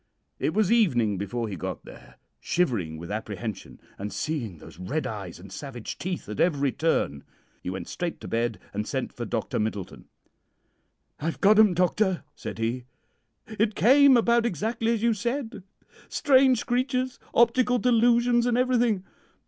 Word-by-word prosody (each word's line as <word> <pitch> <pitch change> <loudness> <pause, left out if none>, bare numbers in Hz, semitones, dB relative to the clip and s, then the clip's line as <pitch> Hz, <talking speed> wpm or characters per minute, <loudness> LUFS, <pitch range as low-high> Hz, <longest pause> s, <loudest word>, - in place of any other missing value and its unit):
It 155 - -1
was 215 -2 +2
evening 120 - +3
before 115 +3 -3
he 100 - -5
got 80 - -6
there, - - -14 0.2
shivering 105 - -1
with 85 +4 -8
apprehension, 110 0 -5 0.2
and 105 +1 -4
seeing 125 - -3
those 80 +1 -14
red 140 +13 -2
eyes 100 -6 -6
and 95 +1 -12
savage 120 +2 -7
teeth 180 -1 -4
at 105 - -6
every 145 -6 +2
turn. 140 - 0 0.4
He - - -5
went 95 +1 -5
straight 175 -2 -4
to - - -7
bed 115 -1 -1 0.2
and 105 +1 -3
sent - - -3
for - - -5
Dr. - - -2
Middleton. 105 -3 -4 1.1
"'I've 160 +2 -3
got 210 +2 +5
'em, 210 -5 +6
doctor,' 185 +1 +1
said 110 -2 -7
he. 115 +2 -2 0.6
'It 220 -1 -1
came 270 +2 +6
about 235 0 +3
exactly 225 +5 -1
as 230 -2 -1
you 235 -1 +4
said 235 0 -3 0.5
strange 260 -3 +4
creatures, 255 +1 -1 0.2
optical 245 +1 +4
delusions, 240 0 +3
and 240 -1 +2
everything. 245 -6 +2
180 Hz, 155 wpm, -26 LUFS, -, 1.1 s, em